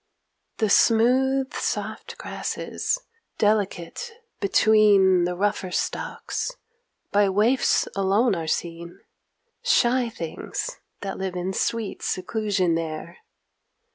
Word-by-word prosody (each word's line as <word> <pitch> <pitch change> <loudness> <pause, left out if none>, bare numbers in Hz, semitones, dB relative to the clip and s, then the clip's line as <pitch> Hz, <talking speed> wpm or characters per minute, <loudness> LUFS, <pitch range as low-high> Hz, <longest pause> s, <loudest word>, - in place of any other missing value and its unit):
The 215 -3 +1
smooth 260 +5 +3
soft - - -3
grasses, - - -3 0.4
delicate 210 - 0 0.3
between 200 -3 +5
The 180 0 -2
rougher 205 0 -1
stalks, - - -3 0.6
by 205 -1 +4
waifs 215 +7 +2
alone 200 +4 +2
are 165 -3 -3
seen, 170 +1 -4 0.6
Shy 255 - +3
things 230 - -5 0.2
that 195 -1 -5
live 190 -1 -3
in 180 +2 -2
sweet 225 +1 -2
seclusion 190 -2 0
there. 165 +1 -4
200 Hz, 95 wpm, -24 LUFS, 180-230 Hz, 0.6 s, between